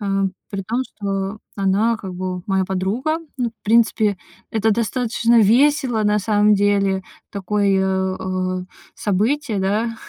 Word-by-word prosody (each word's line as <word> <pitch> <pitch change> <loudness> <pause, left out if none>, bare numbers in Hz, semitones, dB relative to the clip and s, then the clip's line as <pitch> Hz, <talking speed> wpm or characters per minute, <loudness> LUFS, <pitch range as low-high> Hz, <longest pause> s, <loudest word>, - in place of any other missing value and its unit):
э, 205 - -4 0.4
при 195 -1 -4
том, 225 +6 -2
что 195 -2 -4 0.2
она 200 +4 +2
как 190 -3 -7
бы 185 0 -4
моя 190 -1 +1
подруга. 195 - -1 0.2
Ну 245 -3 -1
в 225 - -39
принципе, 220 -2 +3 0.3
это 220 0 +1
достаточно 235 +1 +2
весело 245 +1 +3
на 210 0 +3
самом 210 0 +3
деле. 200 -1 +1 0.3
Такое, 190 -1 0
э, 185 -1 -2 0.3
событие, 220 +4 0
да. 215 +4 0
205 Hz, 130 wpm, -20 LUFS, 190-230 Hz, 0.4 s, принципе